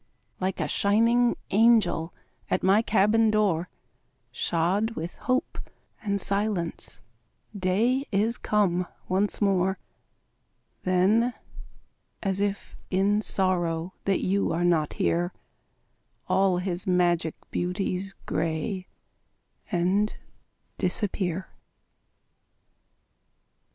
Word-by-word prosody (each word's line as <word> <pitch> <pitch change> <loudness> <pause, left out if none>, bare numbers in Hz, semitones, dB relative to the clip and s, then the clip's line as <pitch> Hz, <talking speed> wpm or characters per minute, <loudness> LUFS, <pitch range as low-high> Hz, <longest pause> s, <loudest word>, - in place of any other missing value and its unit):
Like 185 0 -2
a - - 0
shining 230 +4 +3 0.2
angel 205 -6 +4 0.4
At - - 0
my 195 +3 +5
cabin 220 +1 +3
door, 195 -5 +1 0.6
Shod 185 - 0
with 165 +2 -5 0.2
hope 255 +1 0 0.4
and 200 -2 -1
silence, 200 -4 -2 0.5
Day 220 +8 +1
is 220 +4 +1
come 180 -4 +1 0.2
once 195 +3 +1
more. 190 -1 +2 1.0
Then, 205 +7 +2 0.9
as 195 -1 0
if 200 0 -2
in 200 +3 +2
sorrow 180 -3 0
That 195 -1 +1
you 195 +2 +1
are 165 +2 0
not 160 -4 +2
here, 175 +2 0 0.9
All 190 -1 +3
his 180 0 -2
magic 175 -3 +2 0.2
beauties 185 +1 -2
Gray 165 +4 -2 0.8
and 190 +4 +1 0.6
disappear. 185 -1 -1
190 Hz, 90 wpm, -26 LUFS, 175-210 Hz, 1.0 s, my